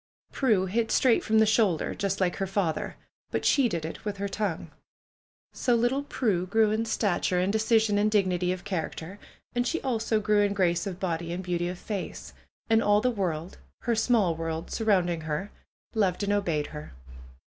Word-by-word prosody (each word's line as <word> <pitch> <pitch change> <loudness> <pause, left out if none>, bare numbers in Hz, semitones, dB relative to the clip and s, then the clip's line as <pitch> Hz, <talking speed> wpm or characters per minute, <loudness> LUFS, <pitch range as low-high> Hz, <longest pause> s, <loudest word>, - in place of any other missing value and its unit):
Prue 215 -9 +2
hit 225 +4 0
straight 250 -3 +3
from 220 - +2
the 220 - +6
shoulder, 210 -6 +2
just 195 0 -2
like 180 -2 +1
her 195 - -1
father; 190 -4 -1 0.3
but - - -2
she 270 -4 +4
did 170 -5 -3
it 160 - -7
with 205 -2 -4
her 200 +1 -2
tongue. 200 -4 -3 0.8
So 245 - +1
little 240 +4 +1
Prue 205 -10 -1
grew 220 +2 +3
in 220 +1 0
stature, 185 -4 +1
in 185 +2 +1
decision 220 -1 +2
and 210 +1 +3
dig 210 -2 +3
nity 180 0 0
of 185 -1 -4
character. 185 0 -4 0.3
And 245 0 0
she 335 - 0
also 225 -4 0
grew 210 0 +2
in 205 -1 +2
grace 175 0 +1
of 185 -2 -5
body 170 -2 -2
and 180 +2 -4
beauty 175 -1 -1
of 180 +1 -4
face. 200 +1 -6 0.3
And 225 0 +4
all 205 -1 +4
the 250 - +2
world 175 -6 -3 0.2
(her 235 - 0
small 220 -6 +2
world 165 0 -4
surrounding 185 -7 +1
her), 155 +6 -3 0.4
loved 200 -3 +1
and 205 0 +1
obeyed 165 -8 0
her. 150 - -8
200 Hz, 190 wpm, -27 LUFS, 175-220 Hz, 0.8 s, the